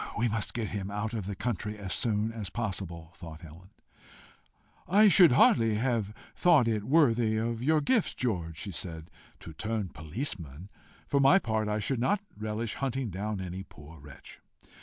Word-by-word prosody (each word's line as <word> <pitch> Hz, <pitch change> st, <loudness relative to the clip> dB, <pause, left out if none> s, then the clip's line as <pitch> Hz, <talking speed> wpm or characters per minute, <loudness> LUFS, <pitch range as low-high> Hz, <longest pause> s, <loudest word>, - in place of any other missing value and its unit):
"We 120 Hz, -, +2 dB
must 110 Hz, -1 st, -1 dB
get 115 Hz, -4 st, -2 dB
him 100 Hz, -1 st, -4 dB
out 105 Hz, +2 st, -3 dB
of 105 Hz, -5 st, -4 dB
the 100 Hz, -, -4 dB
country 105 Hz, 0 st, -3 dB
as 100 Hz, -3 st, -4 dB
soon 110 Hz, -1 st, 0 dB
as 110 Hz, -4 st, -6 dB
possible," 95 Hz, -7 st, -4 dB
thought 80 Hz, -2 st, -10 dB
Helen. 85 Hz, +3 st, -13 dB, 1.2 s
"I 210 Hz, +4 st, +6 dB
should 175 Hz, -6 st, +7 dB
hardly 115 Hz, -4 st, +4 dB
have 115 Hz, -3 st, 0 dB, 0.2 s
thought 165 Hz, -9 st, +4 dB
it 110 Hz, -3 st, 0 dB
worthy 120 Hz, -7 st, +3 dB
of 115 Hz, +1 st, -2 dB
your 155 Hz, +4 st, +3 dB
gifts, 225 Hz, -, +1 dB
George," 85 Hz, -10 st, -2 dB
she 100 Hz, -, -5 dB
said, 80 Hz, -2 st, -7 dB, 0.3 s
"to 80 Hz, -, -10 dB
turn 110 Hz, +2 st, -3 dB
police 95 Hz, -, -4 dB
man. 80 Hz, +4 st, -10 dB, 0.4 s
For 140 Hz, -, +1 dB
my 140 Hz, +7 st, +6 dB
part, 110 Hz, -, -1 dB
I 105 Hz, 0 st, 0 dB
should 115 Hz, +4 st, -1 dB
not 200 Hz, -, +2 dB, 0.2 s
relish 105 Hz, +1 st, -3 dB
hunting 135 Hz, -4 st, -3 dB
down 100 Hz, +2 st, -3 dB
any 95 Hz, 0 st, -5 dB
poor 80 Hz, -4 st, -14 dB
wretch." 70 Hz, -2 st, -13 dB
110 Hz, 175 wpm, -29 LUFS, 95-120 Hz, 1.2 s, should